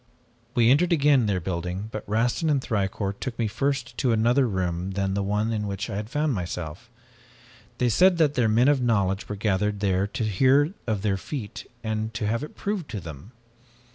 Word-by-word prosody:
"We 120 0 +5
entered 170 +6 +3
again 145 -7 +4
their 100 -3 +1
building 90 +3 -4
but 110 -2 -7
Rastin 120 +9 +1
and 145 -2 +3
Thicourt 100 -3 -2
took 130 -3 -4
me 115 - 0
first 135 +3 -2
to 125 - +2
another 120 +4 +3
room 95 -2 -2
than 95 0 -1
the 100 - 0
one 105 +3 0
in 105 -1 -2
which 100 0 -4
I - - -4
had 105 +1 -5
found 145 +2 0
myself. 90 +2 -5 0.9
They 125 - +1
said 180 - +5
that 155 -4 +3
their 120 -5 +2
men 115 +4 +4
of 145 -3 +3
knowledge 100 -5 0
were 105 - -3
gathered 105 0 0
there 95 -1 +1
to 110 - -4
hear 130 - +3
of 105 -3 -1
their 100 -2 +1
feat, 115 0 -6 0.2
and 110 0 -2
to 110 -1 -2
have 115 +4 -1
it 150 - -8
proved 200 -6 -3
to 110 -2 -4
them. 80 - -10
110 Hz, 200 wpm, -25 LUFS, 100-130 Hz, 0.9 s, We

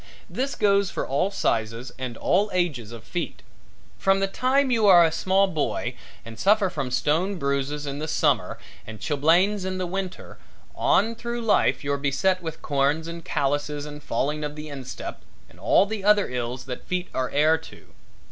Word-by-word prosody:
This 270 +2 -3
goes 200 -1 +3
for - - -3
all 140 +8 +1
sizes 115 - -1
and 125 -3 -5
all 200 +4 +2
ages 150 -12 -1
of 115 -2 -9
feet. 175 +8 -5 0.6
From 195 0 +3
the 195 - +2
time 260 +7 +1
you 225 -3 +3
are 175 -3 +8
a 160 - +1
small 190 +4 +2
boy 160 -7 -2 0.3
and 115 0 -10
suffer 200 -2 +3
from 135 -6 -3
stone 160 +10 +1
bruises 140 -1 -2
in 140 0 -4
the 155 - -3
summer - - +1 0.3
and 110 -1 -8
chilblains 170 +7 +2
in 185 0 -3
the 185 - -2
winter, 185 +1 -5 0.3
on 225 +3 +2
through 235 +1 -4
life 225 -8 +2
you're 140 0 0
beset 165 +7 +1
with 160 -2 -7
corns 145 +3 +1
and 170 0 -7
callouses 145 +1 -1
and 150 0 -9
falling 150 +2 -1
of 150 0 -4
the 150 0 -7
instep 135 -3 -7 0.3
and - - -20
all - - +4
the 210 -1 -5
other 210 0 +4
ills 125 0 -4
that 125 -1 -7
feet 185 0 -2
are 130 -1 -1
heir 155 +3 +3
to. 160 - -15
160 Hz, 180 wpm, -25 LUFS, 140-195 Hz, 0.6 s, are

